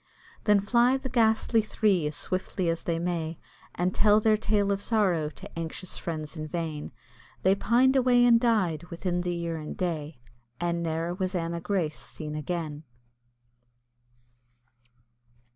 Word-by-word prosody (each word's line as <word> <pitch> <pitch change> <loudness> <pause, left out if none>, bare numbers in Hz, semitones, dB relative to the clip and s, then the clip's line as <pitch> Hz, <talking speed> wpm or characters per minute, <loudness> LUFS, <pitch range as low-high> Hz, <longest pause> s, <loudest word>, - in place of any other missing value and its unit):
Then 210 -2 +5
fly 240 +5 +3
the 265 0 -6
ghastly 225 -1 +3
three 205 -6 +1
as 150 - -5
swiftly 185 0 -2
as 165 0 -2
they 165 -1 0
may, 165 -2 -2 0.4
And 180 +1 0
tell 210 0 +5
their 215 0 +4
tale 210 -2 +1
of 200 0 -1
sorrow 190 -9 +1
to 160 - -10
anxious 165 +2 -5
friends 155 -1 -5
in 155 -1 -5
vain 155 -2 -4 0.5
They 190 - +5
pined 245 +6 +3
away 250 -2 +5
and 235 -1 +6
died 190 -9 +1
within 175 +1 -2
the 175 -1 -2
year 170 -1 -3
and 155 -1 -7
day, 155 -6 -3 0.4
And 170 0 -1
ne'er 165 +1 -2
was 185 0 -2
Anna 170 -1 -2
Grace 170 -5 -1
seen 150 -2 -7
again. 155 -1 -4
175 Hz, 145 wpm, -27 LUFS, 165-210 Hz, 0.5 s, and